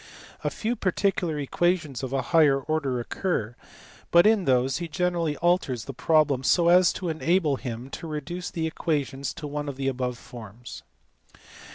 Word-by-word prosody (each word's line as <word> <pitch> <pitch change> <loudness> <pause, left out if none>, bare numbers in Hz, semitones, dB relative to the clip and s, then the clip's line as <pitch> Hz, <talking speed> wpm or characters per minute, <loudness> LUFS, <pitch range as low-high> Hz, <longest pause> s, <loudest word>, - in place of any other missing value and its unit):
A - - +1
few 230 +2 -2
particular 185 -5 0
equations 155 -1 0
of 130 -2 -4
a 135 - 0
higher 150 -5 +4
order 140 -3 -1
occur, 120 - -2 0.5
but 170 +2 +6
in 215 -3 +4
these 130 0 +2
he 170 - -4
generally 170 -3 -1
alters 170 - +1
the 135 - -6
pro 155 +4 +3
blem 135 -3 -2
so 170 +5 +4
as 180 0 +6
to 185 - -5
enable 160 -2 +1
him 125 +1 -6
to 165 - -6
reduce 160 +4 -5
the 165 -1 -3
equation 145 -4 -2
to 140 +2 -4
one 145 0 -4
of 140 - -5
the 135 0 -2
above 125 -2 -2
forms. 120 -1 -10
150 Hz, 170 wpm, -26 LUFS, 130-175 Hz, 0.5 s, but